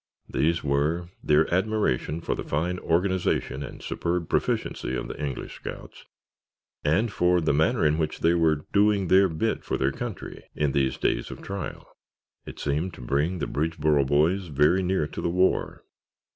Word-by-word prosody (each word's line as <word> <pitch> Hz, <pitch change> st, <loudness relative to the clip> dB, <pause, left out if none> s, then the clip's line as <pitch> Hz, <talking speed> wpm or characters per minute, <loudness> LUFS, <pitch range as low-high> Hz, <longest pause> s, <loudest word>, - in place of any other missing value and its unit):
These 85 Hz, +3 st, 0 dB
were 75 Hz, +5 st, 0 dB
their 75 Hz, +1 st, +4 dB
admiration 95 Hz, -, 0 dB
for -, -, -1 dB
the -, -, -4 dB
fine 90 Hz, +5 st, -1 dB
organization 90 Hz, -5 st, 0 dB
and 70 Hz, -, -8 dB
superb 85 Hz, -1 st, -2 dB
proficiency 65 Hz, -, -1 dB
of -, -, -3 dB
the 75 Hz, -, -6 dB
English 70 Hz, -3 st, -5 dB
scouts, -, -, -9 dB, 0.8 s
and 100 Hz, +10 st, +2 dB
for 90 Hz, 0 st, +3 dB
the 80 Hz, -3 st, +1 dB
manner 80 Hz, +2 st, +2 dB
in 75 Hz, +1 st, +2 dB
which 80 Hz, -1 st, -2 dB
they 85 Hz, -, +4 dB
were 80 Hz, -3 st, +2 dB
"doing 100 Hz, -2 st, +3 dB
their 95 Hz, 0 st, +6 dB
bit" 80 Hz, -1 st, -1 dB
for -, -, -2 dB
their 65 Hz, +1 st, +1 dB
country -, -, -7 dB
in 75 Hz, -2 st, +1 dB
these 65 Hz, -1 st, +1 dB
days -, -, 0 dB
of -, -, -9 dB
trial. 100 Hz, 0 st, -6 dB, 0.6 s
It -, -, -8 dB
seemed 75 Hz, +5 st, -1 dB
to -, -, -11 dB
bring 70 Hz, +8 st, 0 dB
the 75 Hz, -, -2 dB
Bridgeboro 75 Hz, -2 st, +1 dB
boys 85 Hz, +7 st, +2 dB
very 75 Hz, +5 st, +3 dB
near 95 Hz, -3 st, +1 dB
to 75 Hz, -, -6 dB
the -, -, 0 dB
war. 90 Hz, +2 st, +1 dB
80 Hz, 170 wpm, -26 LUFS, 75-90 Hz, 0.8 s, their